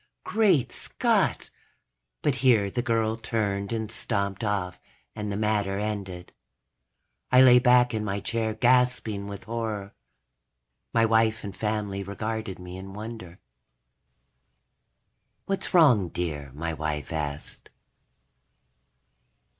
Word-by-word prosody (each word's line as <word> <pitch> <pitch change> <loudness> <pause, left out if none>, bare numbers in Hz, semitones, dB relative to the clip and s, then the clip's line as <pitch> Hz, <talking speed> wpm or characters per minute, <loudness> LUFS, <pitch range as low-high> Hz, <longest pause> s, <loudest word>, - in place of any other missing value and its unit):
_ - - -55
Great 195 - +2
Scott! - - 0 0.7
But 145 -4 +1
here 110 -7 +4
the 120 - -1
girl 115 -2 0
turned 100 -3 -2
and 110 -1 -3
stomped 100 -2 -2
off 100 -4 -2 0.4
and 105 -1 -4
the 100 - -2
matter 105 -2 0
ended. 100 -4 -4 1.0
I 125 +1 +8
lay 125 -1 +8
back 125 -1 +4
in 110 -1 -1
my 100 -1 -2
chair 110 +1 -2
gasping 120 -4 +2
with 100 -1 -7
horror. 110 -3 -4 1.0
My 115 -1 +3
wife 110 0 +2
and 100 -2 -6
family 105 -2 -2
regarded 110 +1 -4
me 90 0 -9
in 95 +1 -9
wonder. 105 -5 -8 2.1
"What's 195 -1 -1
wrong, 125 - +5
dear?" 75 -6 -4
my 80 +2 -3
wife 75 0 -3
asked. 75 -2 -5
105 Hz, 115 wpm, -26 LUFS, 95-115 Hz, 2.1 s, I